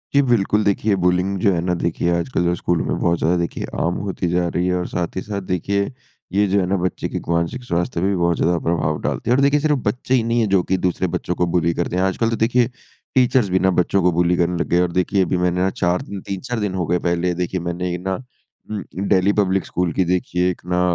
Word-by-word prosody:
जी, 140 - +7
बिल्कुल। 110 -5 +2
देखिए, 100 +1 +1
बुलिंग 90 +2 +1
जो 100 - +3
है 85 - 0
ना, 90 - +1
देखिए 85 0 -1
आजकल 90 +2 -1
जो 85 - +2
स्कूल 85 -1 0
में - - -1
बहुत 85 0 +2
ज़्यादा 85 +3 +2
देखिए 85 -1 -2 0.2
आम 85 +1 +1
होती 95 -2 -2
जा 90 0 +1
रही 90 +1 -1
है, 90 - +1
और 90 - -3
साथ 85 -2 -3
ही 95 - -2
साथ 100 -1 -4
देखिए 100 - 0 0.4
ये 100 +2 +3
जो 100 +1 +2
है 95 - +1
ना, 95 - +1
बच्चे 90 0 -2
के - - -4
एक - - -8
मानसिक 85 +10 -1
स्वास्थ्य 85 -5 -1
पे 95 - +2
भी 100 - +1
बहुत 85 -1 +1
ज़्यादा 85 +1 +2
प्रभाव 80 -2 0
डालती - - -2
है। 120 - +5
और 135 - +2
देखिए, 140 +1 +4
सिर्फ़ 150 -1 +1
बच्चे 125 +4 -1
ही 125 -3 +3
नहीं 115 +1 +1
है 110 - +1
जो 95 -2 +3
कि 95 - 0
दूसरे 90 0 0
बच्चों 90 - -2
को 90 - +1
बुली 85 -1 +2
करते 85 +1 -2
हैं। 90 - +1
आजकल 95 +4 +1
तो 115 - 0
देखिए, 120 +2 +2 0.5
टीचर्स 125 -4 +3
भी 95 - +2
ना 95 - +3
बच्चों 100 +2 +1
को 90 - +4
बुली 85 +1 +2
करने 90 0 +1
लग - - -1
गए - - +2
हैं। 90 - +4
और 90 - -1
देखिए, 90 +3 +1
अभी 90 +1 0
मैंने 90 0 +1
अ, - - +2
4 90 -1 0
दिन, 100 -1 -7
3-4 115 +5 -3
दिन 105 -3 -2
हो 90 -2 -1
गए। 90 +1 +1
पहले 85 +1 0
देखिए, 95 +1 -3
मैंने 85 +1 -3
ये 90 - -2
ना 95 +1 -2 0.6
उम, 105 - -2
अ, - - -8 0.3
डैली 95 +1 +3
पब्लिक 95 -1 0
स्कूल 90 -1 -1
की 95 - +1
देखिए, 90 0 0
एक 90 - -9
ना 90 - +2
90 Hz, 270 wpm, -20 LUFS, 85-100 Hz, 0.6 s, जी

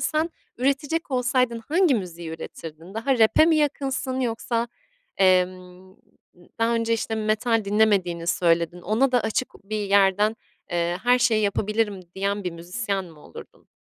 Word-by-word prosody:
sen 315 +2 0 0.3
üretecek 280 +5 -1
olsaydın 250 -2 +1
hangi 335 -1 +3
müziği 175 -6 -5
üretirdin? 165 +2 -9
Daha 245 +4 0
rap'e 225 +7 +5
mi 325 -1 +4
yakınsın 270 -3 -1
yoksa, 235 -1 -1 0.5
emm, 185 0 +1 0.4
d 175 - -21
daha 230 +1 +2
önce, 230 0 0
işte, 225 0 -1
metal 220 +1 0
dinlemediğini 200 -5 +1
söyledin. 170 0 +1
Ona 225 +8 +1
da 245 - +4
açık 225 +3 -1 0.2
bir 215 +2 -3
yerden, 200 +2 +3 0.3
eee, 175 0 -1
her 245 +1 +4
şeyi 225 -3 +2
yapabilirim 210 0 0
diyen 200 +1 -2
bir 180 - -1
müzisyen 190 +4 -3
mi 165 -4 -15
olurdun? - - -14
215 Hz, 145 wpm, -24 LUFS, 185-245 Hz, 0.5 s, rap'e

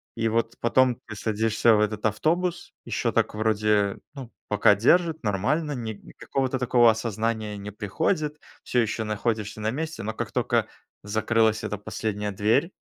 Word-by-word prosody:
И 115 -1 0
вот 115 +1 0
потом 125 +1 +3
ты 110 - -8
садишься 110 +2 +2
в - - +2
этот 105 0 -1
автобус, 175 - -1
ещё - - -1
так - - 0
вроде, 105 -2 +1 0.2
ну 130 -4 -8 0.2
пока 105 0 +4
держит, 160 - +3
нормально, 130 - 0
ни 115 -4 -4
никакого-то 130 +5 -3
такого 120 -1 +5
осознания 110 -1 -1
не 100 +1 -7
приходит, 150 - -1 0.2
всё 125 - 0
ещё 110 0 -1
находишься 105 0 -2
на 110 - 0
месте, 155 +1 -4
но 110 +1 -3
как - - -4
тока - - +1 0.4
закрылась 110 +1 +1
эта 105 -1 -3
последняя 105 0 -3
дверь, 110 - +1
110 Hz, 155 wpm, -25 LUFS, 105-125 Hz, 0.4 s, такого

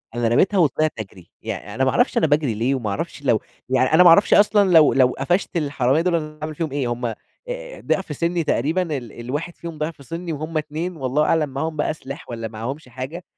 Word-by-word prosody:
أنا 120 -1 +1
رميتها 190 - +3
وطلعت 155 -2 +2
أجري، 95 -4 -9
يعني - - -6
أنا - - +1
ما - - +3
أعرفش - - +2
أنا 160 - +3
باجري 145 -5 +1
ليه 120 +6 0
وما 120 -6 -3
اعرفش 100 - -4
لو - - +2 0.3
يعني 130 +2 +2
أنا 170 +3 +7
ما 175 - +8
أعرفش 185 +5 +6
أصلًا 205 -1 +5
لو 160 -3 +6
لو 130 -2 +5
قفشت 175 +8 -1
الحرامية 140 -1 +1
دول 175 0 +1
أنا 155 -2 -4
هاعمل 155 0 -4
فيهم 160 -3 -3
إيه؟ 140 -3 -1
هُم 120 +1 -3
آآ، 115 - -2 0.7
ضِعف 185 -6 -1
سِنّي 170 +2 0
تقريبًا 155 +6 +1 0.2
ال 120 -4 -8
الواحد 145 +8 -4
فيهم 165 -2 -7
ضِعف 155 -2 -5
سِنّي 165 +5 -5
وهُم 155 +2 -4
2 155 +4 -3
والله 135 +2 0
أعلم 155 -3 +2
معاهم 155 +4 -3
بقى 150 +1 0
سلاح 140 -2 -9
والّا 115 -2 -4
معهمش 120 +6 -6
حاجة، 130 +9 -7
150 Hz, 215 wpm, -22 LUFS, 130-165 Hz, 0.7 s, ما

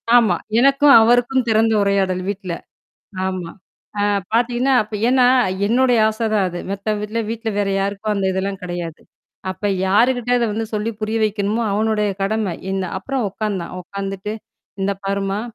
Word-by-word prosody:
ஆமா. 220 -7 +5 0.2
எனக்கும் 275 +2 +5
அவருக்கும் 245 +2 +3
திறந்த 225 0 +3
உரையாடல் 190 -2 +1
வீட்ல. 190 -3 -4 0.7
ஆமா. 185 -3 -4 0.5
ஆ - - +2 0.3
பார்த்தீங்கன்னா, 245 +3 +2
அப்ப 215 +1 -10
ஏன்னா 255 -1 +4 0.4
என்னுடைய 245 +1 +3
ஆசை 220 +1 -3
தான் 200 -3 +2
அது. 175 - -6
மத்த 200 +2 -2
வீட்ல 210 +2 -3
வீட்ல 225 0 -3
வேற 200 -1 +1
யாருக்கும் 200 +2 -2
அந்த 195 -1 0
இதெல்லாம் 195 +1 -3
கிடையாது. 175 -2 -5 0.5
அப்ப 190 +2 -4 0.2
யாருகிட்ட 245 +5 +2
அத 240 - +1
வந்து 225 +1 -2
சொல்லி 215 +2 -1
புரிய 220 +1 -1
வைக்கணுமோ, 210 +2 -1
அவனுடைய 210 0 +1
கடமை 205 -2 -1 0.2
இந்த 190 -1 -1
அப்புறம் 250 +2 -2
உட்கார்ந்தான், 195 -4 -4
உட்கார்ந்துட்டு. 195 +2 -5 0.5
இந்த 200 +1 +1
பாருமா. 195 +1 -1
210 Hz, 145 wpm, -20 LUFS, 195-230 Hz, 0.7 s, ஆமா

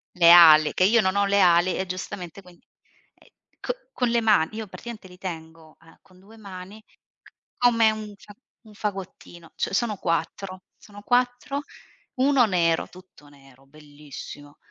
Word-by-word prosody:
Le 170 -1 +6
ali, 155 -3 +7
che 185 - +1
io 225 +4 +4
non 190 0 -1
ho 200 0 +2
le 200 0 +1
ali 175 0 +3
e 190 - -3
giustamente 185 0 -7
quindi 180 -2 -20 0.5
ehm, - - -25 0.3
co - - -3 0.2
con 245 -2 -1
le 235 0 +1
ma 210 -8 +3
io 215 -1 -7
praticamente 220 -1 -10
li 180 0 -16
tengo, 160 -3 -9
uhm, 165 0 -21
con 185 -1 -23
2 215 +4 -18
mani 195 +1 -11
c - - -32 0.6
come 230 -3 +3
un 215 -1 -8
fa 205 - -16 0.3
un 215 -1 -17
fagottino. 190 -5 -8
Cioè - - -3
sono 215 -1 -1
4 185 +3 -4
sono 205 -1 -15
4: 250 +4 -1 0.5
1 265 -1 +3
nero, 170 -4 0
tutto 185 -5 -18
nero, 135 -1 -21
bellissimo 145 0 -13
185 Hz, 165 wpm, -24 LUFS, 165-215 Hz, 0.6 s, ali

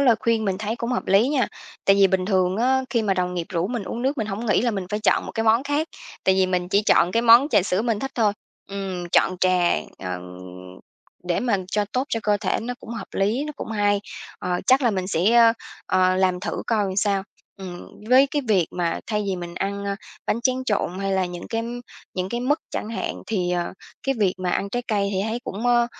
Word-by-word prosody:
lời 255 -4 +5
khuyên 230 -1 +1
mình 190 -2 -1
thấy 215 +2 -3
cũng 235 0 -3
hợp 250 - -2
lý 200 +6 +4
nha! 270 -6 +1 0.4
Tại 195 - +5
vì 200 -1 +6
bình 190 -1 0
thường 185 -2 +2
á, 260 +3 +2
khi 235 -3 +1
mà 200 -3 +1
đồng 180 -1 -1
nghiệp 170 -2 -3
rủ 170 0 0
mình 240 -2 -3
uống 235 +5 -5
nước 270 +2 0
mình 220 - -1
hổng 215 +3 -4
nghĩ 210 0 +3
là 240 - +2
mình 195 -4 -3
phải 210 0 -1
chọn 215 - +2
một - - -7
cái 225 - -1
món 225 +3 +4
khác, 290 +3 -1 0.4
tại 190 - +4
vì 190 0 +3
mình 180 -1 -1
chỉ 200 +2 +3
chọn 180 -3 +4
cái 230 - +2
món 240 +4 +7
trà 195 - +4
sữa 190 +2 0
mình 230 -3 0
thích 270 +4 -4
thôi. 215 -4 +2 0.4
Ừm, 190 -3 -4
chọn 185 - +3
trà, 180 -1 +3 0.3
ờ, 90 -1 -4 1.0
để 175 -1 0
mà 235 -5 +1 0.2
cho 210 -1 +2
tốt 255 +1 +1
cho 225 - -1
cơ 210 -1 +2
thể 200 -2 -1
nó 245 +2 -4
cũng - - -10
hợp 225 -4 -6
lý, 215 +8 +1
nó 300 - -5
cũng - - -6
hay. 205 -2 +2 0.4
Ờ, 180 -1 -2
chắc 260 +2 +5
là 240 - +4
mình 190 -3 -2
sẽ, 190 +3 +2
ờ, 230 -1 +7 0.3
ờ, 185 0 +3
làm 185 -1 +2
thử - - -3
coi 220 -3 +2
làm 190 -1 -3
sao. 200 -1 +1 0.3
Ừm, 180 -2 -8 0.3
với 260 +3 +6
cái 290 +1 -2
việc 190 -6 +3
mà 170 -2 -2
thay 210 -2 -1
vì 190 -2 -1
mình 175 -1 -7
ăn, 200 +2 -3
ờ, 200 0 -1 0.3
bánh 230 - 0
tráng 255 +1 0
trộn 200 -5 -1
hay 195 0 -1
là 190 -1 +2
những 175 0 -8
cái 225 0 -1 0.5
những 185 0 -2
cái 235 +4 -3
mứt 285 +5 +1
chẳng - - -4
hạn, 230 - -4
thì, 185 -5 -1
ờ, 175 -1 -1 0.3
cái 270 - +2
việc 195 -3 +2
mà 185 -1 -1
ăn 200 +2 -1
trái 245 +3 -2
cây 200 -3 +1
thì 190 - -1
thấy 230 +2 -3
cũng 220 +2 -4
ờ, 240 -1 +4
205 Hz, 250 wpm, -23 LUFS, 185-235 Hz, 1.0 s, món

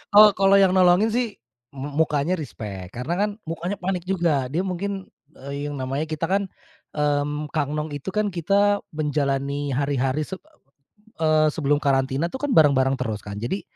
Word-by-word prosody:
Oh 210 0 +10
kalau 195 +1 +5
yang 190 -2 +5
nolongin 185 +4 +5
sih, 245 +1 +1 0.5
mu 140 +2 -6
mukanya 150 +4 0
respect, 100 - -7
karena 125 +7 -2
kan, 210 +1 +2 0.2
mukanya 175 +4 -3
panik 180 -1 -2
juga. 170 -8 +1
Dia 165 - 0
mungkin, 190 +1 -4 0.3
e 140 +1 -6
yang 145 - -5
namanya 135 +3 -2
kita 155 +1 -2
kan, 195 0 +1 0.5
mmm, 150 0 0
Kang 150 -2 -1
Nong 150 0 -3
itu 145 +6 -5
kan 210 -1 +1
kita 200 +4 +2 0.2
menjalani 140 -1 -1
hari-hari, 140 +1 0
se 190 - -6 0.9
eee, 155 -1 +4
sebelum 145 -2 +1
karantina 135 +2 +1
tuh 265 - -6
kan, - - -4
bareng-bareng 135 - +4
terus 110 -5 -3
kan. 100 -1 -7
Jadi, 120 - -3
150 Hz, 165 wpm, -23 LUFS, 140-185 Hz, 0.9 s, Oh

